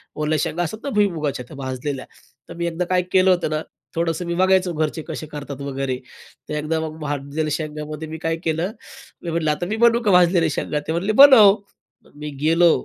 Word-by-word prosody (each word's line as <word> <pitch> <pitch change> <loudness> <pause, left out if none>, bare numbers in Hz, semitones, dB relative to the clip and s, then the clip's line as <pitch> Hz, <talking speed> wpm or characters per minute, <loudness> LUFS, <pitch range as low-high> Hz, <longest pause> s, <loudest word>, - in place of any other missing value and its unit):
ओल्या 155 +1 0
शेंगा 175 +2 -1
असतात 175 +6 -4
ना 280 - -3
भुईमुगाच्या 155 -10 0
त्या 145 - -12
भाजलेल्या, 130 0 -4 0.4
तर - - -7
मी 170 0 -2
एकदा 170 +1 -2
काय 180 0 +2
केलं 190 0 +4
होतं 180 -3 +1
ना, 155 0 -1 0.3
थोडंसं 165 +1 -1
मी 170 - -2
बघायचं 185 -1 +2
घरचे 155 +1 -1
कसे 160 -1 -5
करतात 145 -2 -7
वगैरे, 135 -2 -3 0.5
तर - - -3
एकदा 155 +2 -1
मग 160 0 -5
भाजलेल्या 145 +1 -3
शेंगामध्ये 155 0 -4
मी 160 +1 -6
काय 165 - +1
केलं, 165 +4 -1 0.5
मी 170 - -4
म्हंटलं, 160 -2 0
"आता 150 +4 -2
मी 210 +5 -2
बनवू 235 0 +5
का 210 - +3
भाजलेले 175 -2 +4
शेंगा?" 150 0 -2
ते - - -1
म्हणले, 175 +6 0
"बनव." 220 -5 +8 0.6
मी 150 +1 -6
गेलो. 165 +2 +5
160 Hz, 195 wpm, -21 LUFS, 150-180 Hz, 0.6 s, बनव